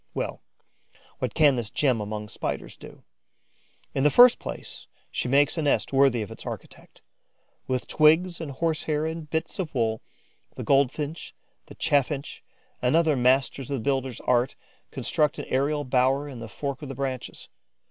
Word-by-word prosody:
Well, -, -, -3 dB, 0.8 s
what -, -, -3 dB
can 145 Hz, -5 st, +5 dB
this 115 Hz, -3 st, -3 dB
gem 125 Hz, -2 st, +1 dB
among 105 Hz, 0 st, -5 dB
Spiders 105 Hz, -, -5 dB
do? -, -, -14 dB, 0.9 s
In 135 Hz, -, 0 dB
the 150 Hz, -, +6 dB
first 245 Hz, -, +7 dB
place, -, -, -8 dB, 0.2 s
she -, -, -2 dB
makes 145 Hz, +5 st, +3 dB
a -, -, +1 dB
nest 145 Hz, -1 st, +1 dB
worthy 135 Hz, -4 st, +4 dB
of 105 Hz, -, -9 dB
its -, -, -9 dB
architect. -, -, -9 dB, 0.6 s
With 130 Hz, -1 st, -1 dB
twigs 170 Hz, +3 st, +3 dB
and 160 Hz, -, -5 dB
horse 155 Hz, +3 st, -1 dB
hair 155 Hz, 0 st, 0 dB
and 160 Hz, -1 st, -5 dB
bits 160 Hz, +4 st, -3 dB
of 165 Hz, -6 st, -4 dB
wool, 110 Hz, -3 st, 0 dB, 0.5 s
the -, -, -5 dB
Goldfinch, 140 Hz, +3 st, 0 dB, 0.3 s
the -, -, -12 dB
Chaffinch 145 Hz, +1 st, 0 dB, 0.4 s
and 125 Hz, +4 st, +2 dB
other 160 Hz, -3 st, +4 dB
masters 130 Hz, +1 st, +2 dB
of 140 Hz, -, -1 dB
the -, -, -5 dB
builder's 135 Hz, -2 st, -1 dB
art 125 Hz, +1 st, +1 dB, 0.3 s
construct 150 Hz, +3 st, 0 dB
an -, -, -5 dB
aerial 145 Hz, +3 st, +1 dB
bower 130 Hz, +2 st, +2 dB
in 130 Hz, -4 st, -8 dB
the 115 Hz, -1 st, -8 dB
fork 140 Hz, +2 st, -5 dB
of 145 Hz, -, -7 dB
the 135 Hz, -, -6 dB
branches. 130 Hz, -2 st, -5 dB
140 Hz, 170 wpm, -26 LUFS, 125-150 Hz, 0.9 s, first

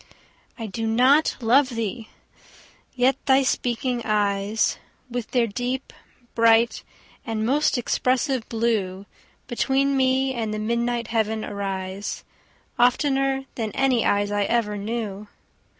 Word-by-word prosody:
I 225 Hz, -, -5 dB
do 225 Hz, +2 st, -3 dB
not 255 Hz, +7 st, +3 dB
love 255 Hz, +4 st, +4 dB
thee!—yet 245 Hz, +3 st, -4 dB
thy 270 Hz, 0 st, +5 dB
speaking 245 Hz, -1 st, -1 dB
eyes, 205 Hz, 0 st, 0 dB, 0.3 s
With 245 Hz, -2 st, -4 dB
their 245 Hz, -2 st, +2 dB
deep, 250 Hz, +4 st, -4 dB, 0.4 s
bright, 230 Hz, 0 st, +4 dB, 0.4 s
and 220 Hz, -4 st, -2 dB
most 290 Hz, +3 st, +2 dB
expressive 255 Hz, +1 st, 0 dB
blue, 210 Hz, -5 st, -1 dB, 0.4 s
Between 270 Hz, +3 st, +1 dB
me 265 Hz, 0 st, +2 dB
and 225 Hz, -3 st, -3 dB
the 215 Hz, -, -3 dB
midnight 235 Hz, +1 st, -1 dB
heaven 220 Hz, -1 st, 0 dB
arise, 195 Hz, -1 st, -4 dB, 0.5 s
15 -, -, -27 dB
Oftener 270 Hz, 0 st, 0 dB
than 220 Hz, -3 st, -3 dB
any 260 Hz, -4 st, +2 dB
eyes 205 Hz, 0 st, +1 dB
I 205 Hz, -1 st, +1 dB
ever 225 Hz, -2 st, 0 dB
knew. 210 Hz, -1 st, -4 dB
235 Hz, 120 wpm, -24 LUFS, 215-260 Hz, 0.5 s, thy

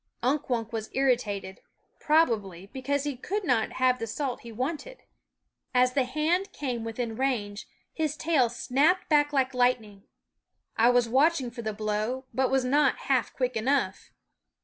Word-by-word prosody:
Unk 275 Hz, +3 st, 0 dB
Wunk 230 Hz, -2 st, -2 dB
was 220 Hz, -1 st, -4 dB
irritated, 210 Hz, -8 st, 0 dB, 0.4 s
probably, 215 Hz, -, +1 dB
because 270 Hz, +6 st, -2 dB
he 290 Hz, -2 st, -3 dB
could 400 Hz, +11 st, -3 dB
not 250 Hz, -9 st, +1 dB
have 255 Hz, -1 st, +2 dB
the 230 Hz, -, -3 dB
salt 255 Hz, +3 st, -3 dB
he 235 Hz, -, -10 dB
wanted. 305 Hz, -, -5 dB, 0.7 s
As 250 Hz, 0 st, +4 dB
the 270 Hz, -2 st, +2 dB
hand 315 Hz, +9 st, 0 dB
came 250 Hz, -5 st, -4 dB
within 225 Hz, 0 st, -4 dB
range, 220 Hz, -6 st, -2 dB, 0.3 s
his 310 Hz, -2 st, -2 dB
tail 305 Hz, -8 st, +2 dB
snapped 280 Hz, +9 st, +1 dB
back 290 Hz, -1 st, +4 dB
like 265 Hz, -2 st, +1 dB
lightning. 235 Hz, -5 st, 0 dB, 0.7 s
I 230 Hz, +2 st, +5 dB
was 245 Hz, -1 st, +3 dB
watching 265 Hz, +1 st, +2 dB
for 235 Hz, 0 st, -7 dB
the 220 Hz, -1 st, -2 dB
blow, 215 Hz, +5 st, -2 dB
but 260 Hz, +2 st, +1 dB
was 265 Hz, -1 st, +1 dB
not 280 Hz, +1 st, +2 dB
half 255 Hz, -3 st, +2 dB
quick 250 Hz, -1 st, -2 dB
enough. 225 Hz, -4 st, 0 dB
255 Hz, 155 wpm, -27 LUFS, 225-285 Hz, 0.7 s, I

